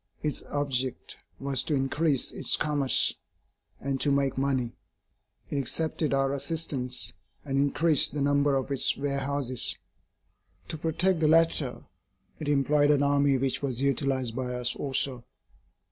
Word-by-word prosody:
Its 150 -2 -2
object 135 -3 -2 0.2
was 135 -2 0
to 150 - -1
increase 140 +1 +1
its - - +2
commerce, 145 -3 +2 0.7
and 135 -1 -3
to 145 - +2
make 140 -1 +1
money. 130 -3 -1 0.8
It 145 - -2
accepted 155 +2 -1
our 135 0 +1
assistance, 140 -3 0 0.3
and 135 -1 -1
increased 145 +2 +4
the 150 - -4
number 140 0 +2
of 135 +1 -2
its 135 - +3
warehouses. 140 -2 -2 0.9
To 160 - -4
protect 165 +3 0
the 155 - +2
latter 160 -5 +2 0.6
it 150 -2 -4
employed 145 +1 +2
an 145 -1 +3
army 140 -1 +2
which 130 0 -2
was 130 -2 -2
utilised 135 -3 0
by 125 -1 -3
us 125 0 -1
also. 135 -2 -1
140 Hz, 135 wpm, -27 LUFS, 135-145 Hz, 0.9 s, increased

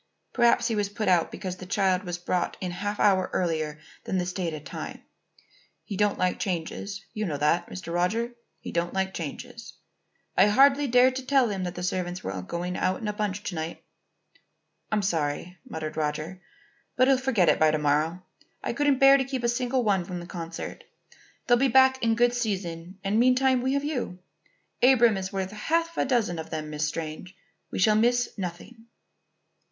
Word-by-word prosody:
Perhaps 240 -1 +4
he 230 - -1
was 205 -1 0
put 215 +1 -3
out 175 -3 +3
because 185 -1 -5
the 185 - -9
child 190 -2 +2
was 175 -1 -3
brought 175 0 -2
in 180 -2 -3
a 175 - -7
half 205 0 -2
hour 190 -2 +3
earlier 155 -4 -1 0.3
than 190 - -1
the 180 - 0
stated 170 -5 -4
time. - - -7 0.8
He 205 - -6
don't 205 +1 +1
like 185 0 0
changes; 195 +2 -4
you 215 - -3
know 150 -4 -2
that, 150 +4 +1
Mr. 170 -2 -7
Roger; 220 +8 0 0.3
he - - -7
don't 170 +2 -1
like 190 0 0
changes. 155 -5 -7 0.6
I - - +6
hardly 275 +6 +5
dared 250 +1 +5
to 265 - -5
tell 270 -4 +4
him 190 -3 -3
that 175 - -5
the 180 - -5
servants 180 0 -2
were - - -3
all 90 - -4
going 175 - -4
out 185 0 0
in 220 - -5
a 210 - -1
bunch 205 -1 -3
to - - -4
night." 160 0 -5 1.1
"I'm 210 -1 +1
sorry," 170 0 -2
muttered 155 -1 -5
Roger. 155 +4 -3 0.5
"But 255 0 +4
he'll 270 -1 +4
forget 245 -9 +2
it - - +4
by 155 - +5
to 155 - +1
morrow. 155 +4 0 0.4
I - - -2
couldn't 285 +1 +2
bear 275 +1 +7
to 270 - +1
keep 260 -2 -4
a - - +2
single 250 +1 0
one 195 -4 +2
from 180 0 -6
the 175 - -8
concert. 170 -2 -7 0.6
They'll 245 - +5
be 270 +3 +3
back 260 +1 +5
in 230 -1 +2
good 240 +1 +3
season 190 -6 -3
and 205 +3 +1
meantime 255 +1 +4
we 260 +2 0
have 280 0 0
you. 260 -11 -3 0.6
Abram 240 -4 +6
is 190 0 -4
worth 190 -1 -3
half 330 +10 -1
a - - +1
dozen 230 -10 0
of 160 0 -7
them, 155 -1 -5
Miss 150 0 -1
Strange. 160 +3 -6 0.3
We - - -5
shall 215 +3 +4
miss 245 +3 +2
nothing." 200 +5 -7
190 Hz, 195 wpm, -26 LUFS, 175-240 Hz, 1.1 s, bear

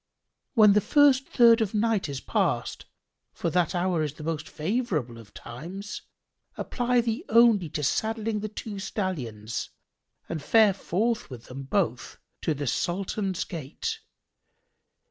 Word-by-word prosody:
When 210 -3 +7
the 210 - +4
first 275 +2 +4
third 230 -2 +6
of 215 -2 -1
the - - 0
night 215 -6 +1
is 140 -2 -4
past, - - -1 0.5
(for 170 - -2
that 175 0 +1
hour 175 -2 +1
is 155 - 0
of - - -25
the 155 - -8
most 155 -1 -3
favourable 155 - -2
of 105 -4 -14
times) 175 - -8 0.6
apply 245 0 +1
thee 230 +5 -2
only 225 -7 +5
to 150 - -3
saddling 220 +7 0
the 215 +1 -4
two 210 -1 -6
stallions 125 - -4 0.6
and 160 -3 -4
fare 215 +6 +5
forth 210 +4 -1
with 120 -3 -10
them 130 +2 -8
both 135 - -1 0.2
to 160 - 0
the 145 +1 -4
Sultan's 190 - -1
Gate. 165 - -5
190 Hz, 145 wpm, -27 LUFS, 150-225 Hz, 0.6 s, When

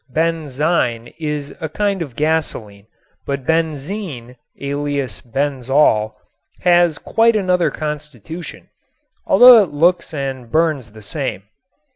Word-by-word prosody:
"Benzine" 150 -5 -1
is 150 -2 -4
a 160 - -3
kind 200 +3 -1
of 140 -8 -6
gasoline, 125 -10 -2 0.4
but 140 -2 -3
benzene 155 - -2 0.2
alias 140 -7 -3
benzol 130 -3 +1 0.5
has 175 -3 +4
quite 225 +7 +2
another 180 -4 +2
constitution, 150 - -7 0.6
although 245 -2 +9
it 190 - -1
looks 170 +6 +1
and 135 -5 -5
burns 155 -8 0
the 110 -1 -13
same. 130 -3 -4
150 Hz, 105 wpm, -18 LUFS, 130-165 Hz, 0.6 s, although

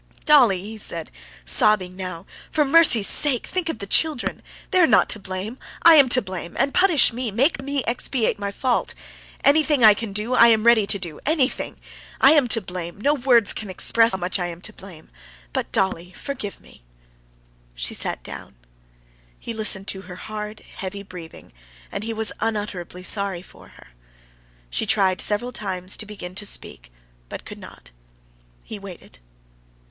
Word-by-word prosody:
"Dolly!" 250 -11 +5
he 215 +3 -9
said, 165 -5 -4 0.3
sobbing 185 - +2
now; 185 -3 -7 0.2
"for 300 - +1
mercy's 275 -8 +5
sake, 265 -1 +3
think 360 -3 -3
of 320 - -3
the 200 - -6
children; 300 +5 0 0.3
they 370 - +3
are 345 - +6
not - - +3
to 215 - 0
blame! 195 +5 -6 0.2
I 335 - +9
am 280 -5 +6
to 255 -1 +3
blame, 185 -3 -7
and 275 +2 +1
punish 360 -9 +4
me, 245 0 -3
make 265 - +1
me 280 0 -2
expiate 235 -1 -1
my 200 -1 -3
fault. 245 +4 -1 0.5
Anything 295 -2 +3
I 215 -1 +9
can 215 0 -6
do, 210 +5 -1
I 235 -2 +7
am 220 -2 +4
ready 230 -3 +4
to 200 - +2
do 170 -5 -6
anything! 290 -4 0 0.4
I 270 - +7
am 295 -5 +4
to 225 -1 +1
blame, 180 -1 -7
no 285 +7 +2
words 245 -6 +3
can 215 - -6
express 230 +5 +3
how - - 0
much 185 +2 -3
I 175 - -2
am 170 -1 -8
to 215 - -9
blame! 185 -6 -14 0.4
But, - - -3
Dolly, 180 -2 -1
forgive 250 -6 -6
me!" - - -20 0.9
She - - -3
sat - - -4
down. - - -10 0.8
He 230 - -6
listened 215 -3 0
to 190 - -4
her 180 -2 -11
hard, 210 +2 -7 0.2
heavy 195 +1 -6
breathing, 180 -4 -12 0.4
and 200 - -5
he 225 - -4
was 220 -1 0
unutterably 205 -5 -4
sorry 195 -2 0
for - - -16
her. - - -18 0.8
She - - -2
tried 190 -2 +1
several 215 +4 -1
times 190 -5 -3
to 215 - -7
begin 195 -4 -8
to 210 +2 -6
speak, - - -3 0.4
but - - -8
could - - -9
not. - - -14 0.7
He 215 - -9
waited. 185 - -12
210 Hz, 175 wpm, -22 LUFS, 185-250 Hz, 0.9 s, I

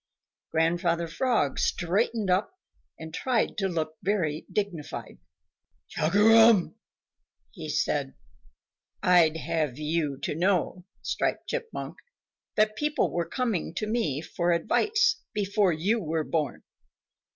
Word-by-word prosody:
Grandfather 170 +1 +1
Frog 215 - 0
straightened 200 +3 0
up 210 - 0 0.4
and 160 0 -9
tried 250 +3 0
to 195 - +1
look 160 -3 -3
very 170 -7 -1
dignified. 195 -8 -4 0.7
"Chugarum!" 215 +3 +5 0.9
said - - 0
he, - - -19 0.9
"I'd 170 -3 +5
have 155 -4 -2
you 150 -2 -1
to - - -1
know, 180 +1 0 0.2
Striped - - -1
Chipmunk, 475 -2 -5 0.6
that 215 0 +2
people 295 +4 0
were 170 -1 -1
coming 225 -10 -2
to 215 - -2
me 210 - -1
for 170 +1 -1
advice 430 - +2
before 200 -1 +2
you 190 +9 0
were 160 -2 -1
born. 150 -4 -2
180 Hz, 110 wpm, -27 LUFS, 160-215 Hz, 0.9 s, Chugarum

